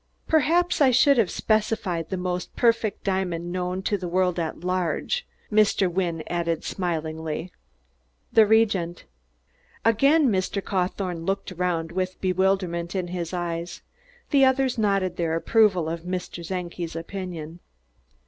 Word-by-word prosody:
"Perhaps 325 +3 +2
I 275 - +7
should 265 +2 +5
have 205 -6 +3
specified 210 -7 0
the 190 - -2
most 180 0 -3
perfect 230 -3 +1
diamond 180 -3 -1
known 180 +1 -2
to 205 0 0
the 180 - -4
world 180 0 +1
at 160 -1 -3
large," 185 - -1 0.2
Mr. 210 -2 +3
Wynne 170 -3 -1
added 170 -2 -1
smilingly. 160 -1 -3 0.8
"The 220 -2 +6
Regent." 205 -6 +2 0.8
Again 275 +6 +4
Mr. 190 +1 0
Cawthorne 185 -3 -2
looked 195 +2 -2
around, 175 -2 -1
with 185 +1 -3
bewilderment 185 -2 0
in 180 -2 -2
his 175 -2 -4
eyes. 175 -1 -4 0.5
The 275 -2 +5
others 265 -1 +3
nodded 195 -4 +1
their 165 -1 0
approval 185 -2 +3
of 165 +1 -3
Mr. 180 -1 -5
Czenki's 175 -1 -4
opinion. 170 -2 -6
185 Hz, 130 wpm, -25 LUFS, 170-205 Hz, 0.8 s, I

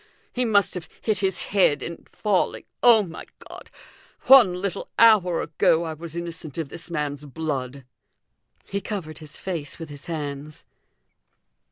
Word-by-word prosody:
He 250 0 0
must 205 -3 +3
have 180 -2 -7
hit 215 -3 -1
his 190 -2 0
head 180 -7 +3
in 170 0 -8
falling. 205 -4 0 0.2
Oh, 230 -3 +7
my 170 -4 -9 0.2
God! - - -12 0.5
one 240 -9 +7
little 185 0 -4
hour 205 -7 +5
a - - -6
go 165 +1 +4
I 160 -1 -4
was 165 +1 -8
innocent 170 -3 -6
of 160 -4 -3
this 170 - -7
man's 150 -3 -3
blood!" 140 -3 -4 0.8
He 200 0 -3
covered 180 -7 -6
his 155 -2 -11
face 165 -7 -5
with 165 -2 -8
his 145 -1 -10
hands. 150 -2 -6
170 Hz, 155 wpm, -24 LUFS, 150-195 Hz, 0.8 s, Oh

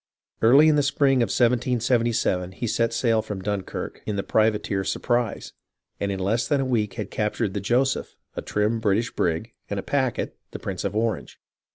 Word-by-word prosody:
Early 135 +7 +7
in 155 -1 +4
the - - +4
spring 140 -1 +2
of 115 - +2
1777 120 -6 +1
he 120 - -4
set 115 +1 +1
sail 115 -1 +2
from 105 -2 -6
Dunkirk 100 -1 -4
in 105 - -1
the 100 - -1
privateer 105 -3 +1
Surprise, 120 +3 -1 0.5
and 100 - -1
in 95 - -2
less 115 +5 0
than 145 - +2
a 135 - 0
week 115 -5 0
had 105 -3 -5
captured 105 -1 -1
the 100 - -2
Joseph, 125 +7 0 0.2
a - - -3
trim 105 +2 0
British 110 +2 +1
brig, 85 +7 -1 0.2
and 100 - -2
a - - -5
packet, 130 -4 -1 0.2
TJie - - -8
Priuce 95 -1 -4
of 100 +1 -2
Orange. 110 0 -2
115 Hz, 185 wpm, -24 LUFS, 100-120 Hz, 0.5 s, Early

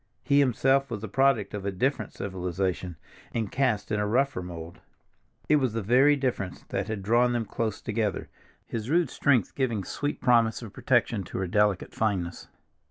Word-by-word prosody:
He 140 0 +3
himself 135 +1 +3
was 110 -4 -4
the 110 - -4
product 135 -2 +2
of 105 -2 -4
a 100 - -1
different 130 +9 -1
civilization, 90 -1 -3 0.4
and 110 -4 -1
cast 125 -7 0
in 105 - +1
a 105 - 0
rougher 130 +1 +1
mold. 85 -2 -8 0.7
It 150 - +5
was 130 -6 0
the 115 -1 -2
very 130 +7 +5
difference 125 -9 -3
that 95 +1 -2
had 110 -3 -4
drawn 120 +4 +3
them 120 -2 -1
close 110 +1 -3
together, 110 -3 -1 0.4
his 115 +1 -5
rude 165 -3 +2
strength 130 -8 +2
giving 115 -7 -1
sweetest 145 +9 -4
promise 120 -2 +3
of 110 - -9
protection 120 -5 +1
to - - -6
her 95 - -1
delicate 105 0 +1
fineness. 95 -6 -2
110 Hz, 175 wpm, -27 LUFS, 100-130 Hz, 0.7 s, It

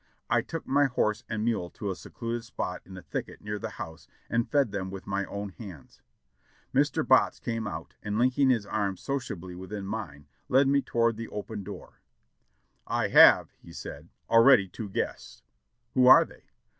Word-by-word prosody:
I - - +4
took - - -6
my 145 +1 +3
horse 110 -4 0
and 110 -1 -2
mule 110 -7 -1
to 100 +1 -5
a - - -4
secluded 115 +5 -5
spot 100 -5 -5
in 95 -1 -11
a 90 - -10
thicket - - -5
near 105 0 -4
the - - -4
house 80 0 -9 0.2
and 115 0 0
fed 140 -7 +2
them 95 -1 -3
with 95 0 -8
my 100 0 -2
own 100 +1 -5
hands. 95 - -12 0.7
Mr. - - +1
Botts - - +4
came 115 -2 -3
out, 80 -4 -7
and 105 0 -3
linking 130 +3 +3
his 115 -5 +2
arm 100 -2 -2
sociably 100 -9 -4
within 95 +3 -7
mine, 95 -9 -6 0.2
led 135 +2 +4
me 140 0 +3
toward 115 -3 +1
the 115 0 -5
open 105 0 -6
door. 100 +1 -10 0.9
"I - - 0
have," - - +7 0.2
said - - -8
he, - - -24 0.2
"already 115 -3 +7
two 100 +3 -7
guests." 95 - -4 0.5
"Who 130 -1 +4
are 130 - +9
they?" - - -18
105 Hz, 180 wpm, -28 LUFS, 95-120 Hz, 0.9 s, are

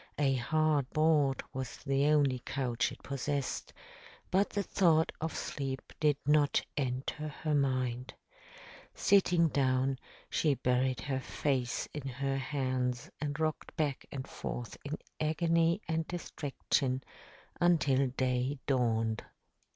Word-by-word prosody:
A 140 -2 +3
hard 150 +1 +2
board 155 -4 +3
was 130 -1 -4
the 140 0 +1
only 145 -4 +3
couch 125 -3 0
it - - -12
possessed, 140 0 -2 0.6
but 195 +2 +3
the 205 - -1
thought 165 -5 +3
of 160 0 -2
sleep 135 -2 -4
did 150 -2 +3
not 150 -1 +3
enter 135 +3 -2
her 155 +1 -3
mind. 130 -3 0 0.8
Sitting 180 -4 +4
down, 130 -1 +1 0.3
she 150 -3 +2
buried 125 -1 +1
her 135 -2 -1
face 130 -2 -1
in 150 -2 -5
her 135 +1 -1
hands 130 -2 -1
and 145 0 -2
rocked 155 0 -2
back 145 -4 -1
and 135 -1 -5
forth 120 -1 -5
in 145 +2 -3 0.2
agony 165 +4 +2
and 160 0 -1
distraction 140 -5 -1 0.6
until 150 -6 +4
day 130 +1 0
dawned. 115 -4 +1
140 Hz, 120 wpm, -32 LUFS, 130-155 Hz, 0.8 s, Sitting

